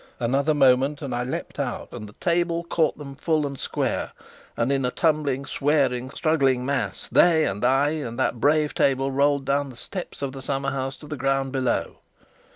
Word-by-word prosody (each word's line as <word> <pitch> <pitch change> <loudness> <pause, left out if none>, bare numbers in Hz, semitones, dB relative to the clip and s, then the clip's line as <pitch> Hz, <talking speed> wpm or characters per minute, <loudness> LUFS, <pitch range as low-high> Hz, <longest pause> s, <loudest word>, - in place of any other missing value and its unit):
Another 140 +6 +1
moment, 135 +2 +3
and 135 - -4
I 120 0 -1
leapt 130 - -5
out - - -3
and 105 - -8
the - - -15
table 170 +2 0
caught 165 -2 0
them 140 -2 -8
full 155 +1 0
and 140 -1 -4
square, - - -2 0.4
and 115 +4 +1
in 135 -1 +1
a 125 - +1
tumbling, 145 -3 0
swearing, 135 -4 +1
struggling 135 -4 +1
mass, 140 0 -2
they 160 -3 +4
and 100 +3 -3
I 135 +3 +3
and 145 -7 -4
that 125 -2 0
brave 150 +3 +2
table, 135 0 +1
rolled 140 0 +2
down 140 0 0
the 125 - -12
steps 160 +5 -6
of 135 - -2
the 135 0 -8
summerhouse 135 0 -2
to 150 - -12
the 150 0 -5
ground 135 0 0
below. 130 -2 -1
140 Hz, 185 wpm, -24 LUFS, 130-150 Hz, 0.4 s, they